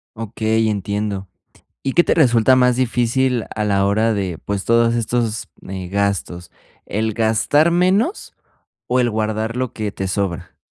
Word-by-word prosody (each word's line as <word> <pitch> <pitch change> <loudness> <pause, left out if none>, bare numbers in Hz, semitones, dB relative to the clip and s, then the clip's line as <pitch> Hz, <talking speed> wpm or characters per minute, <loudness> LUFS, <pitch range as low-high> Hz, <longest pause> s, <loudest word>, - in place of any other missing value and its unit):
Okey, 110 0 -1
entiendo. 100 -1 -3 0.6
¿Y 135 - 0
qué 175 - +5
te - - 0
resulta 130 -4 +4
más 125 -1 +4
difícil 125 0 +1
a 105 - -2
la 100 -1 +2
hora 110 +3 +2
de 95 -5 -3
pues, 100 -1 -3
todos 115 0 +3
estos, 115 -1 -1 0.2
eh, 95 -1 -5
gastos? 100 -3 -2 0.3
¿El 110 +1 -2
gastar 115 +9 +2
menos 190 - +1 0.5
o 125 +1 +1
el 120 -1 +1
guardar 110 +2 -2
lo 130 -2 -2
que 105 -2 -3
te 95 -1 -4
sobra? 95 -3 -3
110 Hz, 150 wpm, -19 LUFS, 100-125 Hz, 0.6 s, qué